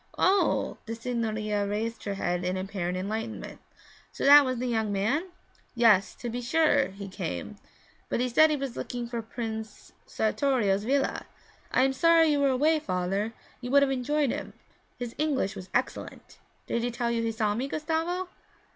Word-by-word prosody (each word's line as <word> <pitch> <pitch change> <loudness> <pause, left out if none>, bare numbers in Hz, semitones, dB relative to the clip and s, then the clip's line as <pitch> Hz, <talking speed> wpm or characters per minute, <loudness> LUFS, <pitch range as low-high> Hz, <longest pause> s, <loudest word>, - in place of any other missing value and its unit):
'Oh!' 390 +2 +2
The 225 - -3
signorina 220 -3 -2
raised 225 +3 -3
her 200 -1 -2
head 180 -2 -1
in 180 +1 -1
apparent 185 -2 -3
enlightenment. 220 +4 -5 0.5
'So - - -4
that 290 +1 +9
was 255 -2 -1
the 250 - -2
young 220 -4 0
man? 235 - 0 0.5
Yes, 210 -6 +4
to 240 - -7
be 240 +1 -3
sure, 285 +2 +3
he 200 +1 -9
came, 90 - -5 0.5
but - - 0
he 250 - +1
said 310 +6 +5
he 305 - +1
was 275 -3 -4
looking 245 -1 -4
for 235 -1 -4
Prince 220 -1 -6 0.2
Sartorio's 215 -4 +1
villa. 275 +2 0 0.4
I 255 - +3
am 265 0 +2
sorry 330 +3 +5
you 295 -1 +2
were 280 -1 +3
away, 300 +5 +3
father, 195 0 -2 0.3
you 245 - -5
would 280 +2 +5
have 275 - +1
enjoyed 270 +1 0
him; - - -5 0.4
his 240 -2 -5
English 285 -10 0
was 185 0 -9
excellent. 245 - -3 0.3
Did 235 - -1
he 240 - -1
tell 235 0 -2
you 230 -1 0
he 230 0 0
saw 215 -2 0
me, 245 +6 -2
Gustavo?' 325 +5 -2
235 Hz, 175 wpm, -28 LUFS, 210-275 Hz, 0.5 s, that